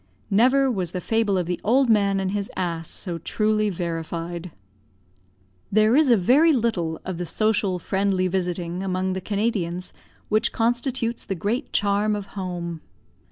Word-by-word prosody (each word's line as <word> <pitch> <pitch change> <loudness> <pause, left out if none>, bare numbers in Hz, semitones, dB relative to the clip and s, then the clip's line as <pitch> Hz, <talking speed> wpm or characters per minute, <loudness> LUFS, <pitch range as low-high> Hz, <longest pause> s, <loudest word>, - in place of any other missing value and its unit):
Never 260 +6 +4
was 185 -6 -3
the 180 - -2
fable 215 +1 +1
of 180 - 0
the 180 +1 -3
old 260 +5 +3
man 200 -3 +3
and 190 -1 -1
his 200 0 -2
ass 170 -3 -2
so 175 -4 -5
truly 215 +4 +1
verified. 170 0 -4 1.2
There 215 +3 +4
is 300 -2 +4
a 235 - +6
very 280 - +5
little 200 - 0
of 185 -2 -4
the 175 - -2
social, 210 -3 +1
friendly 190 +1 0
visiting 180 -1 -2
among 185 0 -1
the 190 - -3
Canadians 195 -4 -2 0.3
which 215 +2 +1
constitutes 240 0 -1
the 195 - -3
great 220 - -2
charm 205 +1 +1
of 205 -1 -4
home. 175 -4 -4
195 Hz, 155 wpm, -24 LUFS, 180-220 Hz, 1.2 s, a